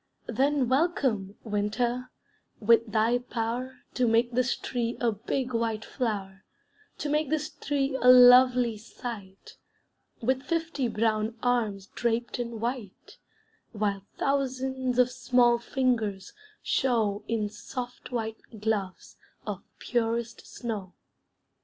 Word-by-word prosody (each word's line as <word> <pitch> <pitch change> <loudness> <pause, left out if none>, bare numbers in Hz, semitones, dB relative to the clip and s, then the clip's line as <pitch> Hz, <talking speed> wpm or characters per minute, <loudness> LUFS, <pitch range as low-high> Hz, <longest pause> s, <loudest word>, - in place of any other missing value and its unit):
Then 275 -1 +1
welcome, 260 - +1
winter, 235 +4 -1 0.5
with 230 0 +4
thy 225 +3 +3
power 245 +1 -4
To 250 -1 +2
make 230 +2 +3
this 250 +1 +1
tree 240 -1 -3
a 235 -2 +2
big 245 +4 -3
white 230 -1 -1
flower; 200 -6 -3 0.5
To - - -3
make 300 -1 +1
this 305 0 -1
tree 275 -1 -1
a 250 - +3
lovely 250 -2 +7
sight, 210 -4 -9 0.6
With 260 +2 +1
fifty 325 -3 -1
brown 220 0 0
arms 220 -6 0
draped 235 +2 -2
in 235 -2 -4
white, 235 -4 -5 0.5
While 200 -2 -2
thousands 260 -2 -1
of 250 0 +4
small 245 -1 +3
fingers 230 -6 -1 0.3
show 220 -6 +1
In 220 -2 0
soft 245 +5 -7
white 225 -2 -3 0.2
gloves 205 -3 -3 0.3
of - - -4 0.2
purest 235 -1 -2
snow. 210 -6 -5
235 Hz, 115 wpm, -28 LUFS, 220-255 Hz, 0.6 s, lovely